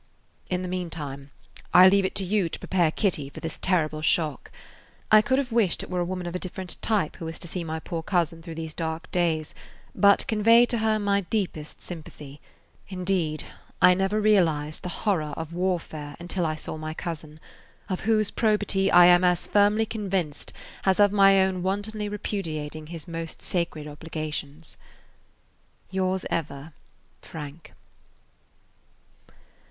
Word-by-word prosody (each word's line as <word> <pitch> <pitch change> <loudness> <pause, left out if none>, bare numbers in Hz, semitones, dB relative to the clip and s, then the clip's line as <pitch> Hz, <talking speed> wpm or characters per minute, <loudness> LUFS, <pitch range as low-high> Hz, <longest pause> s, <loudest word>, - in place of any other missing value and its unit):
In 180 0 -1
the - - -3
meantime 155 -6 -5 0.5
I 180 +1 +10
leave 195 0 +4
it - - -3
to 195 - +1
you 190 -2 +1
to - - -5
prepare 175 -4 +1
Kitty 155 -5 -1
for - - -10
this 160 - -6
terrible 155 -5 +1
shock. 155 -2 0 0.6
I 215 0 +8
could 260 +3 +1
have 270 -3 -1
wished 225 -6 +2
it - - -9
were 180 - -1
a 175 - 0
woman 180 0 -4
of 175 - -4
a 180 - -2
different 185 0 -6
type 205 -8 0
who 165 - -7
was 165 0 -5
to - - -5
see 175 +1 -4
my 160 0 -4
poor 165 0 -4
cousin 165 -2 0
through 165 -1 -8
these 160 -1 -5
dark 160 0 -4
days, 165 -3 0 0.4
but 200 -1 +4
convey 230 +2 +5
to 240 -1 -1
her 220 0 +2
my 200 -1 +1
deepest 180 -6 -3
sympathy. 150 -4 -9 0.5
Indeed, 180 -5 -1 0.4
I 180 - +7
never 195 +3 0
realized 165 -8 +2
the 180 - -5
horror 170 -6 -1
of 160 0 -6
warfare 170 -5 -2
until 175 0 -2
I 155 - -1
saw 155 - -6
my 155 0 -5
cousin, 155 -2 -6 0.5
of 185 -3 -2
whose 215 -1 +1
probity 205 -3 +1
I 175 0 +8
am 175 0 +6
as 180 -1 +2
firmly 210 +2 +3
convinced 195 -9 -3 0.3
as 190 0 +2
of 205 -1 +6
my 195 -1 +6
own 190 -1 -1
wantonly 205 +3 -2
repudiating 155 -7 -4
his 165 0 -8
most 165 -1 -5
sacred 170 -4 -2
obligations. 155 0 -5 1.1
Yours 190 0 0
ever, 145 -1 -4 0.5
FRANK. 150 +1 -9
175 Hz, 160 wpm, -26 LUFS, 155-195 Hz, 1.1 s, I